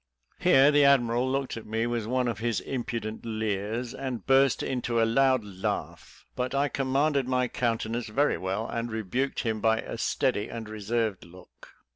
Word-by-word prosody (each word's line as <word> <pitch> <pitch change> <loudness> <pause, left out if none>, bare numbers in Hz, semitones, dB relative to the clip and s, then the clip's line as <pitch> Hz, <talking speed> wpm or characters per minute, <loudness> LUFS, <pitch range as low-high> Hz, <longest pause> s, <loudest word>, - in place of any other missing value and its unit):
Here 135 +2 +6
the 145 -1 +5
admiral 125 -2 +3
looked 135 -3 -2
at 115 - -9
me 110 +1 -1
with 120 -2 -2
one 125 +1 +1
of 115 - -2
his 115 -2 0
impudent 115 -4 -4
leers, 110 +1 -2
and 130 -6 -5
burst 135 -1 +4
into 120 -2 -1
a 115 - +4
loud 130 +1 +3
laugh; 95 -2 -5
but 125 +2 -2
I 140 +1 +2
commanded 140 0 +1
my 125 -1 +1
countenance 115 -1 -2
very 140 +7 +1
well, 95 +4 -2
and 115 0 -3
rebuked 110 +5 -2
him 110 -3 -1
by 110 0 +3
a - - -6
steady 105 - 0
and 115 -2 -6
reserved 110 -1 -2
look. 90 +2 -16
120 Hz, 170 wpm, -27 LUFS, 110-130 Hz, -, Here